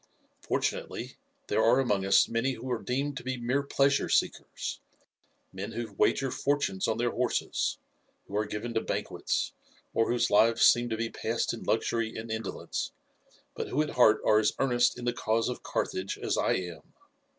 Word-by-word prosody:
Fortunately - - -2 0.3
there - - +1
are 120 +3 +5
among 105 -7 +1
us 95 0 +5
many 115 +4 0
who 125 +2 -6
are 120 - -1
deemed 140 +3 -2
to - - -6
be 130 0 -3
mere 125 +4 0
pleasure 140 0 +2
seekers - - -1 0.7
men 95 +2 -5
who 115 -3 -5
wager 135 +6 +2
fortunes 140 -10 0
on 110 -1 0
their 120 0 +1
horses, 125 0 -1 0.5
who 100 - -8
are 105 0 0
given 105 +3 -4
to 110 - +1
banquets, - - -2 0.4
or 115 - +2
whose 120 -2 +1
lives 115 +3 +5
seem 120 0 +5
to 110 - -2
be 115 0 -2
passed - - -1
in - - -7
luxury 115 -1 0
and 110 +1 -6
indolence, 110 -2 -4 0.6
but - - -4
who 140 - -2
at 155 - -5
heart 110 -3 +5
are 110 - +5
as 105 - +2
earnest 120 -3 +2
in 125 - -6
the 120 - +1
cause 115 0 0
of 125 - -5
Carthage 95 +1 -2
as - - -1
I - - +2
am. 90 -2 -6
115 Hz, 180 wpm, -29 LUFS, 110-125 Hz, 0.7 s, are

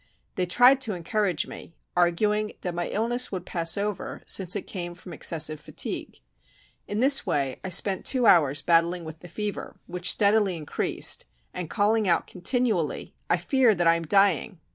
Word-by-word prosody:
They 180 -1 -2
tried 250 +8 +5
to 220 -6 -1
encourage 180 -1 -1
me, 165 - -11 0.2
arguing 210 +5 +1
that 180 - -4
my 175 0 -2
illness 240 +4 0
would 185 -3 -5
pass 165 0 -1
over, 205 -1 -4
since 185 -1 0
it 205 - -2
came 175 -3 -6
from 175 0 -11
excessive 155 -2 -1
fatigue. - - -5 0.7
In 205 +2 -2
this 270 +1 +4
way 135 -3 -2
I 185 - -4
spent 190 +2 +1
two 255 -3 +1
hours 145 -7 +4
battling 170 0 +2
with 160 0 -9
the 175 - -12
fever, 210 +4 -5
which 180 0 -1
steadily 205 -3 +2
increased, 150 -2 0 0.3
and 175 -3 -5
calling 215 0 +1
out 170 -2 +2
continually, 205 - -1 0.2
"I - - +3
feel 255 -6 +3
that 175 -1 0
I 165 0 +5
am 170 - -2
dying." 195 +2 +2
185 Hz, 170 wpm, -26 LUFS, 170-210 Hz, 0.7 s, tried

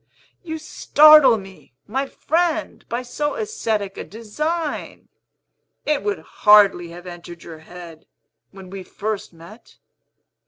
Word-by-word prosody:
"You 320 -3 -6
startle 305 -4 +6
me, 195 - -13
my 265 +6 -2
friend, 325 +2 -1
by 240 +2 -3
so 295 +4 -3
ascetic 225 - -3
a - - -5
design! 300 +10 -5 0.8
It 300 -2 0
would 415 -1 -2 0.2
hardly 205 -5 +6
have 175 +2 -11
entered 175 -1 -10
your 160 -2 -10
head, 165 -1 -13 0.4
when 190 -1 -13
we 195 -1 -7
first 210 +2 -5
met. 170 +7 -16
220 Hz, 120 wpm, -21 LUFS, 180-305 Hz, 0.8 s, startle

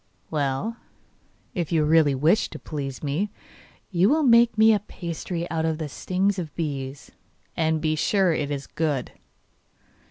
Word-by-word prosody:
'Well, 150 - -1 0.8
if 175 -4 -3
you 160 -2 +3
really 155 -2 +4
wish 160 +11 +2
to - - -8
please 140 -3 -6
me 155 +9 -1 0.6
you 180 +2 +3
will 310 +3 +3
make 235 -3 +5
me 220 +1 +7
a 210 - +2
pasty 170 -2 -5
out 160 -1 0
of 160 -1 0
the 155 -1 -4
stings 190 +6 -1
of 160 -4 -6
bees, 140 -4 -4 0.4
and 160 -1 +1
be 155 0 0
sure 190 +2 +2
it 150 -2 -2
is 140 -1 -3
good. 150 -6 -2
160 Hz, 155 wpm, -25 LUFS, 150-190 Hz, 0.8 s, me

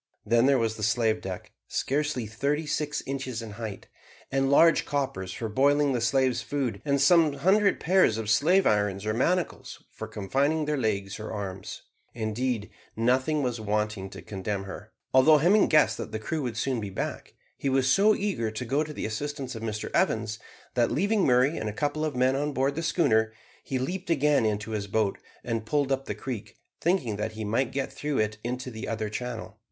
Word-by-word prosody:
Then 115 +3 +4
there 140 -1 +5
was 115 -2 0
the - - -7
slave 110 +1 +1
deck, 95 -1 -6 0.2
scarcely 145 -3 -1
thirty 140 +8 -1
six 150 0 -2
inches 130 -4 -4
in 110 - -7
height, 110 -1 -7 0.4
and 135 0 +1
large 165 +4 +5
coppers 130 -10 -2
for 115 - -4
boiling 140 +5 +3
the 120 - -1
slaves' 130 +2 +2
food, 130 -8 -2
and 140 -1 +1
some 155 +1 +5
hundred 200 +6 +3
pairs 180 - +3
of 110 -1 -4
slave 170 - +4
irons 105 -1 +1
or 110 - 0
manacles 175 +10 -1
for - - -7
confining 140 +10 0
their 150 0 0
legs 105 -5 -2
or 110 - -6
arms; 95 -3 -6 0.3
indeed, 115 0 -2 0.2
nothing 130 +6 +1
was 120 -3 -2
wanting 105 -2 -1
to - - -10
condemn 100 0 -4
her. 105 +2 -9 0.2
Although 150 +4 +7
Hemming 185 +8 +4
guessed 155 -1 +4
that - - -5
the 110 - -2
crew 150 +9 -3
would 120 -4 -3
soon 125 -1 -1
be 100 - -4
back, 95 - -5 0.2
he 140 - -2
was 130 -1 +2
so 205 +10 +5
eager 195 - -1
to 110 +4 -5
go 140 +6 +1
to 150 0 -7
the - - -4
assistance 135 +4 -4
of 115 - -7
Mr 110 -1 -4
Evans, 110 0 +1 0.3
that 120 -2 +2
leaving 200 +4 +2
Murray 130 +4 +3
and 110 - -2
a - - -5
couple 145 +5 -1
of 155 -4 -2
men 130 +1 +3
on 145 +1 -1
board 135 +1 +1
the 165 - -3
schooner, 120 -10 +2 0.3
he 135 - -2
leaped 180 +8 -4
again 145 -6 +3
into 105 +1 -2
his 105 -2 -3
boat 105 0 0 0.2
and 115 -2 -2
pulled 145 +1 +1
up 135 0 0
the - - -4
creek, 125 -6 -6 0.2
thinking 155 - 0
that 105 +1 -3
he 110 0 -5
might 115 +5 0
get 135 -1 -3
through 145 -2 -2
it 105 0 0
into 125 +2 -4
the 110 0 -6
other 110 -1 -2
channel. 110 -1 -6
125 Hz, 200 wpm, -27 LUFS, 110-145 Hz, 0.4 s, Although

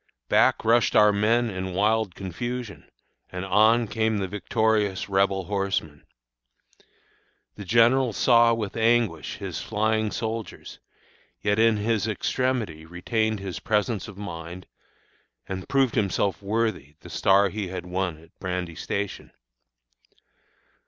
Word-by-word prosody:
Back - - +3
rushed 115 +1 +3
our 105 -1 +6
men 115 +3 +2
in 95 -1 -5
wild 105 -1 +1
confusion, 115 +3 -6 0.4
and 90 +1 -5
on 110 +4 +4
came 110 +1 0
the 95 -1 -2
victorious 105 0 0
Rebel 95 0 +1
horsemen. 95 -7 -3 1.5
The 100 - -9
general 120 +5 +4
saw, 115 +2 +4
with 105 -3 -4
anguish, 115 -9 +1
his 100 -4 -5
flying 110 0 0
soldiers, 110 0 -5 0.6
yet 105 +1 +1
in 115 -1 +4
his 110 0 0
extremity 110 -6 -2
retained 110 +5 -2
his 95 -2 -5
presence 105 0 -1
of 105 -3 -11
mind, 85 -2 -7 0.8
and 95 -1 -6
proved 135 -4 +2
himself 100 -1 0
worthy 100 -8 -2
the - - -12
star 100 +1 +3
he 105 -1 -4
had 90 -1 -6
won 90 -2 -2
at 80 +1 -21
Brandy 90 -2 -3
Station. 100 +4 -4
105 Hz, 125 wpm, -25 LUFS, 95-110 Hz, 1.5 s, our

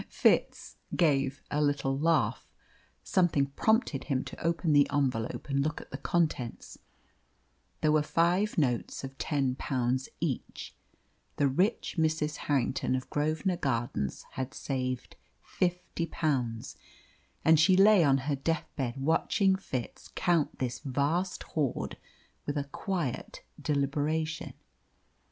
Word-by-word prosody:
Fitz - - +1 0.2
gave 140 -4 +2
a 150 - +1
little 140 -2 +1
laugh. 160 +3 +1 0.6
Something 170 -6 +2
prompted 155 - +1
him 135 -3 0
to - - -9
open 165 -1 +1
the 145 -1 +5
envelope 130 -5 -1
and 140 -1 +1
look 155 0 -2
at - - -13
the 135 - -5
contents. 150 -7 -1 1.0
There 155 - +3
were 155 0 +4
five 175 +7 +1
notes 125 -6 0
of 135 0 -7
ten 140 -4 0
pounds 130 -1 -1
each. - - -4 0.6
The 145 - +3
rich 185 - 0
Mrs. 155 -1 +1
Harrington 130 -2 0
of 130 - -5
Grosvenor 155 +4 0
Gardens 120 - -2
had 130 0 -5
saved 130 -2 -3 0.3
fifty 180 -2 -2
pounds, 125 -9 -1 0.7
and 160 -1 +6
she 185 +4 +5
lay 200 -2 +7
on 135 -3 +3
her 145 -1 +1
death 155 +3 -2
bed 125 -4 -2
watching 165 +7 +2
Fitz 130 -10 -5
count 170 -4 +1
this 125 -1 -2
vast 150 +7 -1
hoard 145 -6 -2 0.5
with 145 0 -1
a 145 - 0
quiet 150 - -4 0.2
deliberation. 150 +3 -1
145 Hz, 125 wpm, -30 LUFS, 135-165 Hz, 1.0 s, lay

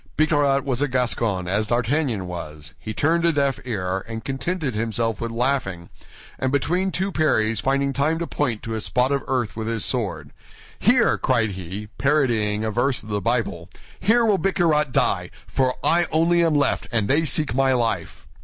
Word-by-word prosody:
Bicarat 145 -3 +2
was 130 -1 -1
a 145 - +2
Gascon, 115 -7 0
as 105 +4 0
D'Artagnan 120 -2 0
was; 80 -3 -7
he 110 - -6
turned 165 +9 +1
a 170 - +4
deaf 140 -3 0
ear, 95 -5 -2
and 115 -1 -6
contented 135 +1 -2
himself 115 +1 -1
with 115 - -2
laughing, 115 -8 -2 0.5
and 130 - 0
between 180 +7 +1
two 190 +1 -2
parries 110 - +1
finding 140 +2 0
time 150 +4 +1
to 170 - -2
point 125 -9 -2
to 115 -2 -4
a 110 - -3
spot 125 +4 +1
of 140 -1 0
earth 125 -4 -1
with 110 0 -4
his 115 -1 0
sword, 90 - -2 0.5
"Here," - - +3
cried 115 -5 +1
he, 95 +2 -6
parodying 120 -8 +1
a 110 - -1
verse 125 +4 0
of 110 - -12
the 105 -1 -1
Bible, 115 -8 -1 0.3
"here 230 +4 +3
will 205 -4 +3
Bicarat 165 -7 +1
die; - - +1 0.2
for 130 -1 0
I 170 +1 +4
only 170 +2 +3
am 165 -2 +2
left, 145 - +1
and 110 -4 +1
they 150 +7 +3
seek 150 -1 +1
my 135 +1 +2
life." 115 -9 -2
125 Hz, 180 wpm, -23 LUFS, 110-145 Hz, 0.5 s, a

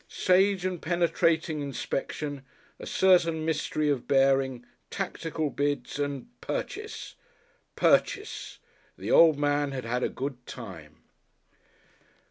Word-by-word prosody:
Sage 190 0 +2
and 185 -3 -2
penetrating 165 -2 +1
inspection, 140 +1 -4 0.4
a - - -8
certain 170 -4 +3
mystery 155 -1 -1
of 140 -4 0
bearing, 135 -2 +2 0.2
tactical 160 -2 -3
bids 145 -1 -2
and 145 -1 -2 0.2
Purchase! 435 -3 -5 0.6
Purchase! 405 +2 +1 0.4
the - - -4
old 160 -3 +7
man 145 -1 +1
had 130 -3 -4
had 125 +2 -1
a - - +1
good 130 -2 -5
time. 85 -11 -10
145 Hz, 105 wpm, -28 LUFS, 135-170 Hz, 0.6 s, old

